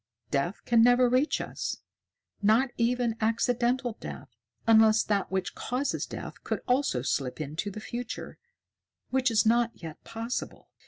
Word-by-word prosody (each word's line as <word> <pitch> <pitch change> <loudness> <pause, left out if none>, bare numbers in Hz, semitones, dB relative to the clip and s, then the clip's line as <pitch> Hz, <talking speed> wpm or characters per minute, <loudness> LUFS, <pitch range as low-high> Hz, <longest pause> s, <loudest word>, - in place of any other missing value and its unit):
Death 145 +7 -1
can 235 -1 +4
never 245 +1 +6
reach 255 +5 +2
us, - - -4 0.6
not 220 +6 +4
even 240 -1 +1
accidental 240 +2 +1
death, - - -8 0.4
unless 220 -1 +6
that 200 -2 0
which 190 -1 -1
causes 255 +4 -2
death - - -8
could - - -2
also 250 - +1
slip 130 0 -1
into 155 +7 -3
the 205 - -7
future, 240 +2 -6 0.7
which 260 0 +2
is 220 -2 +3
not 235 +1 +4
yet 160 -2 -8
possible." 230 +2 -5
230 Hz, 140 wpm, -28 LUFS, 205-245 Hz, 0.7 s, never